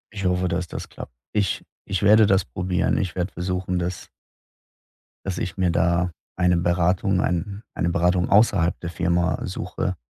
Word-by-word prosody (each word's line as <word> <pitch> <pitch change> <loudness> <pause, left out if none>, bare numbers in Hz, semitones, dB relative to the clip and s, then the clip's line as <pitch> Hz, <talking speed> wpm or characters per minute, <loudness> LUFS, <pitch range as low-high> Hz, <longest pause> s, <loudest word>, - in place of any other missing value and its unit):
Ich 100 -2 -4
hoffe, 90 0 +1
dass 90 0 -2
das - - -7
klappt. - - -9 0.2
Ich 105 -3 -1 0.2
ich 95 +1 -2
werde 105 +1 +6
das 95 -2 +3
probieren, 90 +7 0
ich 95 - -2
werde 90 +1 -2
versuchen, 90 0 -2
dass 90 0 -4 1.2
dass 95 -2 -3
ich 85 0 -4
mir 90 -2 +2
da 85 +1 +1 0.2
eine 90 -1 +3
Beratung 90 +2 +1
ein 100 +4 -2
eine 85 - 0
Beratung 90 +1 +1
außerhalb 100 -5 +4
der 85 - -4
Firma 85 +1 0
suche, 90 0 -3
90 Hz, 160 wpm, -23 LUFS, 85-95 Hz, 1.2 s, werde